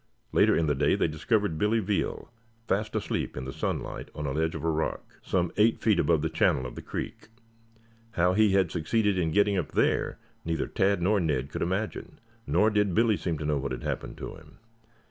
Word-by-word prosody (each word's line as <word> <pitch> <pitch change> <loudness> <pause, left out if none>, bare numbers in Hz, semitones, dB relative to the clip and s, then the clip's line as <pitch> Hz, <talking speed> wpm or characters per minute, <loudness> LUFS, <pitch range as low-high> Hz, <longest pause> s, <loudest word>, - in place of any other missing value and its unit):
Later - - +4
in 85 - +2
the 75 - +2
day 70 +1 +2
they - - +1
discovered 80 +3 0
Billy 105 +2 +2
Veal 105 0 -2 0.4
fast 105 +2 -1
asleep - - -2
in 65 - -4
the 65 - -6
sunlight - - -4
on 75 - -4
a 70 - -1
ledge 80 +3 0
of 80 - -5
rock, 80 -1 -2
some 90 -3 0
eight 110 +2 +4
feet 105 -5 +2
above 80 -3 +2
the - - +2
channel 65 - +2
of 65 - -6
the - - -8
creek. - - -6 0.9
How 90 -1 +3
he 105 0 +4
had 95 -4 +3
succeeded 100 +4 +1
in 85 -2 +1
getting 100 +2 +3
up 85 - -5
there - - +1 0.3
neither 80 -2 -1
Tad 100 -2 +1
nor 105 +3 +3
Ned 75 -5 -1
could - - -4
imagine, 95 +5 -3 0.3
nor 110 +1 +3
did 105 -4 +1
Billy 115 -1 +4
seem 85 -4 -2
to 75 - -5
know 75 -1 +1
what 70 0 -4
had 65 - -6
happened - - -4
to - - -6
him. - - -16
90 Hz, 205 wpm, -28 LUFS, 80-105 Hz, 0.9 s, Later